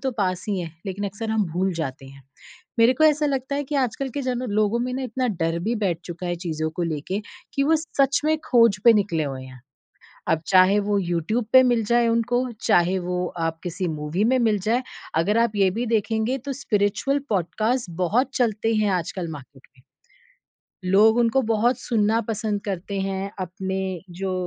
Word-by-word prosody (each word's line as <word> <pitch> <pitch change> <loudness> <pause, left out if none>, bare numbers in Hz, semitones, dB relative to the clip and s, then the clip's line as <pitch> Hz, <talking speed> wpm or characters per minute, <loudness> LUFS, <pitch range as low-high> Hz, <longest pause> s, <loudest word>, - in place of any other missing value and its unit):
तो 265 -1 -1
पास 185 -3 -1
ही 200 -2 0
हैं, 165 -2 -6
लेकिन 195 +1 -3
अक्सर 205 +3 -4
हम 220 -2 +1
भूल 185 +2 0
जाते 135 -4 -5
हैं। 135 0 -14 0.6
मेरे 235 +3 +6
को 315 - +3
ऐसा 300 -1 +4
लगता 270 0 -2
है 290 - -2
कि 290 - -5
आजकल 265 +1 -1
के - - 0
जन 250 -1 -2
लोगों 215 +2 +1
में 250 +1 -2
ना 265 - -3
इतना 255 +1 -2
डर 165 +1 0
भी 225 +6 -1
बैठ 185 -6 -1
चुका 175 +1 -6
है 175 - -1
चीज़ों 160 -1 -2
को 175 - -1
लेके 170 +5 -2 0.3
कि 275 - +2
वो 320 +2 +4
सच 280 -3 +1
में 315 - +3
खोज 230 -6 +5
पे 235 - +9
निकले 175 -7 +1
हुए 135 -2 -5
हैं। 130 -1 -12 0.7
अब 160 - +2
चाहे 190 +2 +5
वो 205 0 0
यूट्यूब 175 +6 -1
पे 260 - +9
मिल 240 -3 +2
जाए 235 +1 +3
उनको, 245 +2 0
चाहे 175 +2 +3
वो 180 0 -2
आप 165 0 -2
किसी 180 +1 -3
मूवी 155 +5 -2
में 260 - +4
मिल 220 -3 +2
जाए। 230 +6 +1 0.3
अगर 200 +7 +2
आप 235 -2 +2
ये 195 -2 +4
भी 235 +5 -2
देखेंगे 225 +3 0
तो 275 - -2
स्पिरिचुअल 210 +7 +1
पॉडकास्ट 215 +5 0
बहुत 240 +10 +2
चलते 225 -2 +1
हैं 215 -1 +2
आजकल 180 0 -2
मार्केट 140 -2 -12
में। 125 - -23 1.1
लोग 220 +3 +5
उनको 235 +3 +3
बहुत 230 +2 +1
सुनना 225 -1 +1
पसंद 210 -1 -2
करते 195 0 -3
हैं, 195 +1 -3
अपने 190 0 -3 0.2
जो 190 - -1
205 Hz, 195 wpm, -23 LUFS, 180-240 Hz, 1.1 s, पे